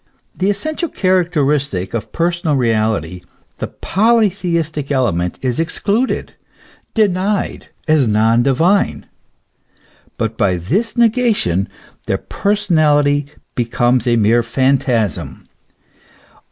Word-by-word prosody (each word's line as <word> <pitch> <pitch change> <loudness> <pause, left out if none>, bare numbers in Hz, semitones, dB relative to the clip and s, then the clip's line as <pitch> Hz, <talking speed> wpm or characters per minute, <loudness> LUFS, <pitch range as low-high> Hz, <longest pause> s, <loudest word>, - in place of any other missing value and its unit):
The 190 +2 0
essential 310 - -2
character 180 -5 +1
istic 135 -11 -1
of 115 - -4
personal 170 -2 0
reality, 110 - 0 0.4
the - - -4
polytheistic 180 -9 0
element, 90 -10 0
is 125 0 -1
excluded, 205 +9 -1 0.6
denied 200 -1 0 0.2
as 155 -5 +3
non 110 +2 +3
divine. 165 +10 +1 1.1
But 110 0 -3
by 100 -4 +2
this 195 - -1
negation 225 - +2 0.4
their - - +1
personality 150 -8 +1 0.3
becomes 120 +1 0
a 120 - +3
mere 115 +2 +3
phantasm. 125 - -1
145 Hz, 95 wpm, -17 LUFS, 115-190 Hz, 1.1 s, as